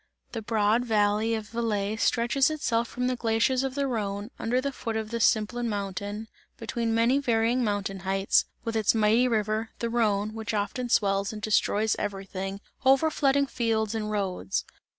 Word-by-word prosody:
The 225 - -4
broad 220 +1 +2
valley 215 0 +2
of 215 -1 -6
Valais 215 -2 -1
stretches 240 +5 +2
itself 240 -7 0
from 250 +2 -3
the 255 0 +1
glaciers 235 +2 +1
of 270 -1 -3
the 280 -1 0
Rhone, 210 -3 -3
under 245 +3 +1
the 280 +2 -2
foot 230 -4 -4
of 220 0 -4
the 235 - -2
Simplon 230 +2 +2
mountain, 205 +1 -4 0.3
between 230 0 -2
many 235 +4 +3
varying 235 -1 +1
mountain 200 -2 -2
heights, 195 +1 +2 0.2
with 230 -1 -3
its 220 0 +2
mighty 220 +3 +4
river, 220 -1 0
the 235 -1 -3
Rhone, 215 -3 +1
which 220 -1 -4
often 240 +4 -2
swells 195 -2 +2
and 215 - -7
destroys 215 0 +1
everything, 195 -1 -4 0.2
overflooding 275 0 +3
fields 225 -4 0
and 215 -1 -2
roads. 190 - -2
220 Hz, 165 wpm, -27 LUFS, 205-240 Hz, 0.3 s, mighty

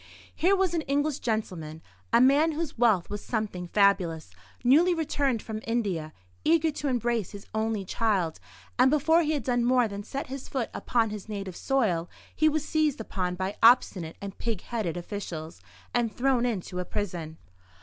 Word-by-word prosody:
Here 380 +4 +3
was 375 -3 +1
an 335 - +1
English 285 +1 0
gentleman, 170 -9 -3 0.3
a 235 - +5
man 285 +6 +5
whose 320 0 -3
wealth 220 -7 +3
was 205 0 -5
something 210 -6 -3
fabulous, 180 - +2 0.3
newly 325 +8 +5
returned 280 -7 0
from 215 -1 -5
India, 195 -10 -1 0.3
eager 325 0 +3
to 295 0 -4
embrace 240 -5 0
his 200 -1 -9
only 220 -2 -1
child; 190 -6 0 0.4
and 255 +1 +6
before 320 +4 +4
he 310 -1 0
had 290 - -2
done 245 -2 +1
more 250 -1 +3
than 200 -1 -6
set 270 +7 -5
his 270 0 -7
foot 260 -4 -2
upon 225 -3 0
his 210 0 -7
native 195 -4 -5
soil, 195 -12 0 0.3
he 310 0 +4
was 305 0 -2
seized 310 -4 +1
upon 180 -4 -3
by 190 +2 -3
obstinate 205 -8 +4
and 200 -1 -7
pig 225 -5 -2
headed 210 -8 -3
officials, 170 - -6 0.3
and 240 -2 +1
thrown 250 -1 +2
into 185 -5 -3
a - - -1
prison. 170 -6 -4
225 Hz, 170 wpm, -27 LUFS, 190-270 Hz, 0.4 s, and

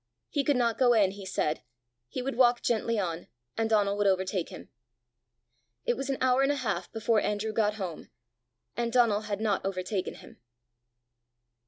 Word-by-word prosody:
He 285 - +1
could 285 0 +2
not 235 -2 +1
go 245 -2 +5
in, 205 -4 +4
he 195 -1 -9
said; 155 -4 -1 0.5
he 250 - -4
would 270 +1 -3
walk 240 -1 +4
gently 230 0 +1
on, 175 -4 -3 0.3
and 225 0 0
Donal 205 -2 +3
would 205 -1 +2
overtake 190 -2 0
him. - - -10 1.2
It 240 - +2
was 270 +1 -4
an 270 - 0
hour 255 0 +3
and 275 +1 +3
a - - 0
half 200 -10 -2
before 225 -1 +1
Andrew 210 +1 -1
got 210 -1 +1
home, 185 -6 -6 0.7
and 235 -1 -1
Donal 230 -4 +3
had 205 -1 -3
not 215 -2 0
overtaken 190 0 -2
him. - - -15
215 Hz, 175 wpm, -29 LUFS, 195-240 Hz, 1.2 s, go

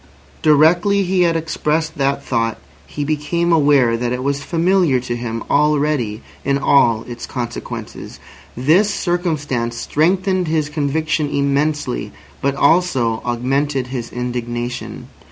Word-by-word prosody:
Directly 175 +7 +4
he 185 0 +1
had 170 -1 +3
expressed 160 0 -1
that 140 0 0
thought 115 -1 -1 0.3
he 145 - -4
became 155 +3 0
aware 140 -6 +4
that 120 +1 -2
it 125 0 -2
was 140 +1 -1
familiar 170 -2 +2
to 120 -1 -4
him 115 -1 -4
already 145 -7 +1 0.2
in 140 +1 +1
all 120 -5 +3
its 120 -1 -8
consequences. 120 -2 -6 0.4
This 170 - +3
circumstance 150 -11 -2
strengthened 185 +6 +1
his 155 -2 0
conviction 150 +1 -1
immensely, 140 - -1 0.3
but 140 0 0
also 135 -7 +2
augmented 130 +2 -1
his 120 -3 -4
indignation. 120 0 -4
140 Hz, 120 wpm, -18 LUFS, 125-160 Hz, 0.4 s, Directly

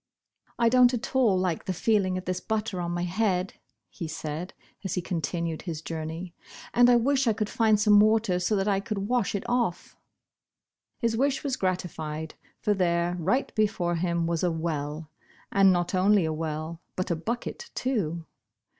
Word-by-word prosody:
'T 235 - +4
don't 250 +1 +5
at 255 +3 -6
all 230 -8 +4
like 180 -3 -1
the - - -1
feeling 185 -1 +1
of 185 - -6
this 185 0 -2
butter 215 -4 -2
on 170 - -2
my 175 0 -2
head," 185 0 0 0.3
he 170 - -7
said, 155 +3 -5 0.3
as 190 - -2
he - - 0
continued 170 -1 -3
his 165 -4 -5
journey, 160 +2 -5 0.2
" - - -15
and 245 0 +6
I 245 - +6
wish 265 +2 +2
I 225 - +4
could 215 0 -3
find 220 -4 +3
some 210 -1 +6
water, 215 -3 +3
so 180 +4 +1
that 195 0 0
I 195 -2 +2
could 200 -1 -3
wash 245 -5 0
it 200 - -4
off." 235 -7 -1 1.0
His 230 -2 0
wish 275 +3 +1
was 275 -3 -1
gratified, 160 -5 -3 0.3
for 210 - +1
there, 175 -2 +1
right 195 - 0
before 200 -5 +1
him, 170 0 0
was 165 -1 -1
a 180 - +2
well. 155 -1 -3 0.4
And 195 -1 +6
not 175 0 0
only 190 0 +4
a 160 - -1
well, 160 +1 -4
but 185 -1 -2
a - - +2
bucket, 240 - -4
too. 170 - -1
185 Hz, 180 wpm, -27 LUFS, 170-220 Hz, 1.0 s, and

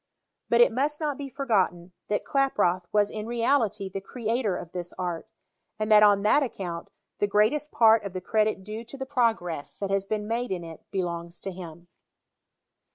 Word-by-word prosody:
But 235 0 +5
it 240 - +6
must 285 +5 0
not 295 -3 -2
be 280 -1 -5
forgotten, 195 -10 0 0.2
that 205 - -1
Klaproth 205 -10 +1
was 210 -1 +2
in 215 0 -5
reality 230 -4 +1
the 195 +1 -5
creator 225 -2 -1
of 165 - -8
this 175 -1 -6
art, 175 +1 -3 0.5
and 215 0 -2
that 210 0 +8
on 205 -1 +5
that 215 +8 +4
account 180 -10 -4 0.3
the 205 - +2
greatest 215 +9 +2
part 225 -1 +5
of 200 -2 -6
the 185 - -3
credit 215 +1 0
due 215 +3 -6
to 240 +4 -10
the 265 - -4
progress 225 - -1
that 200 -1 -3
has 195 0 +1
been 210 0 -2
made 235 +2 -1
in 180 -2 -2
it 165 -1 -10
belongs 170 -2 -4
to 195 - -4
him. 170 -2 -10
210 Hz, 185 wpm, -27 LUFS, 185-235 Hz, 0.5 s, that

